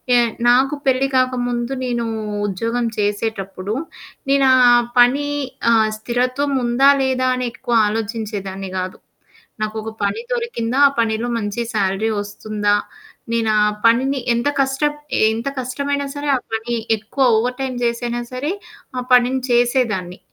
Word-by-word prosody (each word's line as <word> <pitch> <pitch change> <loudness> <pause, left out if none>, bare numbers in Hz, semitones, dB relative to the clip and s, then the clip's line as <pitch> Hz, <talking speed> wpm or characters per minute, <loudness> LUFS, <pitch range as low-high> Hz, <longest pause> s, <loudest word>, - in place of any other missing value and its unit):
ఎ - - +6 0.3
నాకు 265 +4 +4
పెళ్లి 265 +1 +2
కాకముందు, 245 -1 0
నేను 240 -1 -1 0.4
ఉద్యోగం 230 +5 -2
చేసేటప్పుడు, 205 -1 -2 0.6
నేనా 275 -1 +4 0.5
పని 275 +4 +4 0.4
ఆహ్, 220 -1 +4
స్థిరత్వం 250 +5 -1
ఉందా 240 +4 +4
లేదా 255 -1 +1
అని 255 -1 -2
ఎక్కువ 240 - -4
ఆలోచించేదాన్నిగాదు. 195 -4 -4 0.6
నాకొక 215 +1 -3
పని 200 - 0
దొరికిందా? 275 - -2
ఆ - - +2
పనిలో 225 +1 0
మంచి 210 +1 -3
శాలరీ 200 +1 0
వస్తుందా? 205 0 -1 0.6
నేను 230 -1 +1
ఆ - - +5 0.2
పనిని 265 +4 +3
ఎంత 235 +5 +1
కష్ట 270 +1 0 0.5
ఎంత 230 +4 -4
కష్టమైనా 280 +3 -2
సరే. 290 0 -5
ఆ - - +2 0.2
పని 225 +2 -2 0.2
ఎక్కువ 220 +6 -2
ఓవర్‌టైమ్ 250 +3 -1
జేసైనా 240 0 -1
సరే 265 +5 -2 0.5
ఆ - - -2
పనిని 250 +1 +4
చేసేదాన్ని. 240 -7 +1
240 Hz, 120 wpm, -19 LUFS, 215-255 Hz, 0.6 s, ఎ